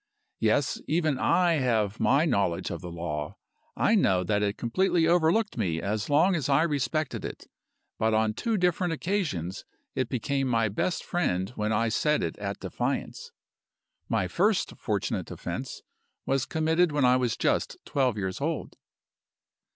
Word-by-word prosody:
"Yes! - - +1
even 155 -5 +1
I 175 -3 +3
have 110 -5 0
my 140 +5 +3
knowledge 100 - 0
of 85 - -5
the 90 - -7
law. 75 -3 -4 0.4
I - - +3
know 90 -1 +3
that 105 +3 0
it 105 0 0
completely 170 +7 +1
overlooked 175 - +2
me 85 -6 0
as 105 +3 -2
long 160 +7 +4
as 150 -6 -1
I 140 +3 +4
respected 155 -1 -1
it. - - -7 0.5
But 110 0 +2
on 110 0 +2
two 225 - -1
different 180 -1 +1
occasions 150 - -2 0.3
it 130 -2 -1
became 135 +3 -1
my 115 -3 +2
best 140 - -1
friend 95 - -1
when 105 -3 -2
I 115 +2 +1
set 150 +7 +1
it 85 - -2
at 100 -1 -4
defiance! - - -3 0.8
My - - +1
first - - +1
fortunate - - -2
offense - - -6 0.4
was 135 -1 0
committed 160 +2 +2
when 145 -3 +2
I 125 0 +5
was 125 -3 0
just - - 0
twelve 130 -5 +1
years 95 -2 -3
old. - - -3
125 Hz, 155 wpm, -27 LUFS, 105-160 Hz, 0.8 s, I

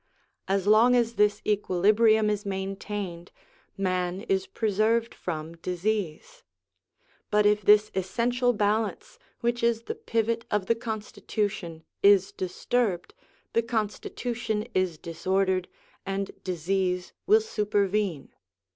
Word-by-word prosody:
As 195 -1 0
long 220 +4 +6
as 235 -1 +2
this 210 -2 +2
equilibrium 210 +2 +3
is 205 -1 -2
maintained, 195 -2 -5 0.5
man 185 -1 -1
is 390 - -1
preserved 225 - +1
from 165 -1 -5
disease; 200 - -3 0.9
but 210 0 +3
if 210 0 +4
this 210 +1 +5
essential 240 +6 +1
balance, 220 - -1 0.2
which 240 0 0
is 230 -1 +1
the - - -4
pivot 230 0 -1
of 210 -2 0
the 230 - +3
constitution, 210 -6 -4 0.2
is 200 -1 +5
disturbed, 185 +1 -1 0.4
the 230 - +3
constitution 225 0 -3
is 185 -4 0
disordered, 185 +3 0 0.4
and 195 0 -3
disease 180 +1 -1
will 430 +2 +6
supervene. 205 - -1
210 Hz, 110 wpm, -27 LUFS, 185-230 Hz, 0.9 s, long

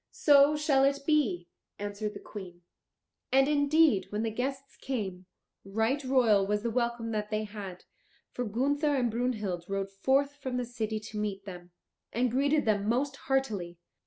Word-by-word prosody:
"So 290 0 +5
shall 295 -3 +3
it 280 +1 +2
be," 225 - +1 0.3
answered 205 +1 -4
the - - -6
Queen. 180 -5 -10 0.7
And 270 +1 +5
indeed, 290 -6 +3
when 210 +1 -2
the 225 - -1
guests 265 +4 -4
came, 190 -8 -4 0.4
right 225 +8 0
royal 245 -6 +4
was 210 +1 0
the 235 - -1
welcome 235 -1 -1
that 210 -1 -2
they 215 0 -1
had. 205 -4 -8 0.5
For 250 - -3
Gunther 285 +7 +1
and 245 -4 +1
Brunhild 215 -7 -2
rode 195 0 -2
forth 270 +8 +1
from 260 -3 -4
the 250 - -1
city 220 -2 -3
to 210 0 -6
meet 200 -2 -3
them, 180 -2 -9 0.4
and 245 +1 +1
greeted 285 +4 +2
them 210 -1 +1
most 270 +4 0
heartily. 215 -12 -2
230 Hz, 160 wpm, -29 LUFS, 205-270 Hz, 0.7 s, So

